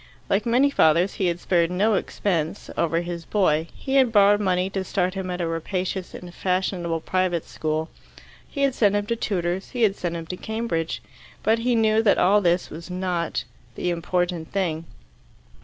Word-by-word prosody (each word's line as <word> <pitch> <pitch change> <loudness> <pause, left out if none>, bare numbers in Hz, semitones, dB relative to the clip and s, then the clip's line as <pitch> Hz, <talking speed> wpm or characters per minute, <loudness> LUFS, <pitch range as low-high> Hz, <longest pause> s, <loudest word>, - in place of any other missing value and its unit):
Like 205 +3 +1
many 260 +4 +4
fathers, 170 - +3
he 185 - +3
had 175 0 -1
spared 170 -2 +2
no 200 +5 +2
expense 170 -5 -2
over 165 0 +1
his 170 -1 -5
boy, 165 -4 +1
he 270 0 -1
had 260 -3 +4
borrowed 205 -1 +5
money 185 -2 +1
to 195 -1 -2
start 185 0 -1
him 190 -1 -4
at 180 0 -3
a - - 0
rapacious 180 +3 -3
and 175 -1 -9
fashionable 180 -3 -1
private 185 -1 0
school; 155 0 -2 0.6
he 280 - -2
had 275 -2 +3
sent 205 -4 +3
him 205 0 0
to 235 - -1
tutors; 185 -4 -2
he 245 -2 -1
had 200 -3 +3
sent 170 -3 -3
him 165 - -6
to 180 +3 -6
Cambridge. 220 -8 -3 0.4
But 225 +1 +3
he 240 +1 +1
knew 220 -1 +3
that 215 -3 +4
all 205 +3 +4
this 175 -1 +1
was 165 +4 -8
not 180 -2 -2 0.3
the 180 - -1
important 175 -1 -2
thing. 165 -5 -1
185 Hz, 185 wpm, -24 LUFS, 170-205 Hz, 0.6 s, borrowed